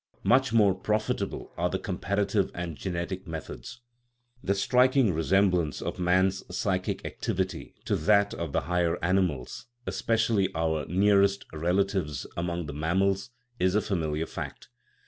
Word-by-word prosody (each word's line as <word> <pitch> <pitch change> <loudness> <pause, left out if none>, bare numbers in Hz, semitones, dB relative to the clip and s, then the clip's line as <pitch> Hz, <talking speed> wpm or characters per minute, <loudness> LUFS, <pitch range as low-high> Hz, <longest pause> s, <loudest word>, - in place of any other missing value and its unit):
Much 130 0 +4
more 105 -4 +5
profitable 105 +3 -2
are - - +1
the - - -1
comparative 100 0 0
and 85 -2 -4
genetic 95 +2 -4
methods. 80 - -7 0.6
The 100 - +1
striking 125 +1 +3
resemblance 90 -1 +2
of - - -4
man's 95 +2 +2
psychic 95 -2 -1
activity 95 -2 -3
to - - +1
that 100 +4 +3
of 85 -3 -4
the - - +1
higher 85 -1 0
animals 90 - 0 0.2
especially 110 -4 +1
our 80 -2 0
nearest 100 +2 +3
relatives 85 -3 0
among 85 0 -2
the 70 - -6
mammals 95 - 0 0.3
is 95 +1 +2
a - - +5
familiar 80 -6 -1
fact. - - -7
95 Hz, 130 wpm, -28 LUFS, 85-100 Hz, 0.6 s, more